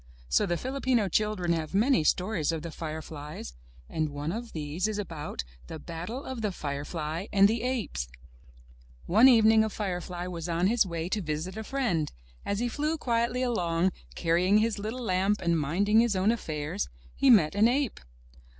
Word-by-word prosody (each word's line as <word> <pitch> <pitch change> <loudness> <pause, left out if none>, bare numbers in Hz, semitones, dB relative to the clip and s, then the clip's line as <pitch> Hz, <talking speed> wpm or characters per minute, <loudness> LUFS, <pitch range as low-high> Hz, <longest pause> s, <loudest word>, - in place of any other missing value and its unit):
So 65 - +3
the 175 - 0
Filipino 260 -3 0
children 190 -2 +1
have 160 +2 -3
many 220 - +4
stories 180 -1 +1
of 160 -2 -4
the 170 - -5
fireflies, 155 - -7 0.3
and 155 -1 -1
one 145 +2 -4
of 230 +4 -5
these 155 +5 -2
is 215 -1 -2
about 160 - -5 0.2
The 160 - -6
Battle 175 - -6
of 260 -3 -5
the 210 -2 0
Firefly 155 +3 -4
and 200 0 +6
the 225 +2 -1
Apes. 225 - -2 1.0
One 220 +8 +6
evening 220 -3 +6
a 220 - -1
firefly 180 -4 -4
was 175 -2 -5
on 170 +1 +1
his 220 0 +3
way 165 -1 -3
to 210 - -1
visit 155 +3 -3
a 220 - -4
friend. 215 - -1 0.3
As 200 - -1
he 240 +3 0
flew 300 +6 -1
quietly 240 -1 0
along, 180 -7 +1 0.2
carrying 180 +4 +3
his 215 -1 +1
little 225 +5 -4
lamp 195 0 +1
and 170 -2 +1
minding 200 +9 +2
his 230 -3 +3
own 190 +4 +3
affairs, 150 - -3 0.3
he 275 - +3
met 185 -11 +6
an 210 +3 +5
ape. 265 0 0
190 Hz, 175 wpm, -28 LUFS, 165-225 Hz, 1.0 s, and